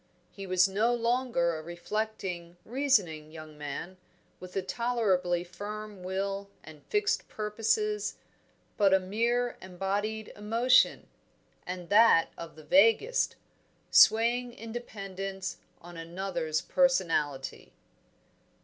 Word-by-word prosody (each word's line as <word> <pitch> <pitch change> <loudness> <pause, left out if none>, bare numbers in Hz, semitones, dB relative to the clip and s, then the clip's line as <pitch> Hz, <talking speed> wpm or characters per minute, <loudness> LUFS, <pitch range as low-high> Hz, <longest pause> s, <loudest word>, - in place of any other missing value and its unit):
He 195 -1 -8
was 185 +1 +4
no 220 +5 +1
longer 235 -8 +1
a 155 - -5
reflecting, 175 0 -4
reasoning 205 - +1
young 155 -1 -11
man, 150 +5 -6 0.4
with 180 0 -11
a 195 - 0
tolerably 190 -5 0
firm 205 +2 -8
will 195 +2 -3
and 155 -2 -13
fixed 415 0 0
purposes, 225 - -1 0.6
but 195 -2 +5
a - - +4
mere 235 +6 0
embodied 200 +4 -3
emotion, 230 +5 +3 0.6
and 180 -1 -6
that 210 -5 +6
of 170 -1 -9
the 155 - -13
vaguest, 225 - +4 0.6
swaying 240 +2 +5
in 230 -1 -9
dependence 195 -4 -5 0.2
on 175 0 -11
another's 170 -2 -3
personality. 165 - 0
195 Hz, 105 wpm, -29 LUFS, 175-230 Hz, 0.6 s, that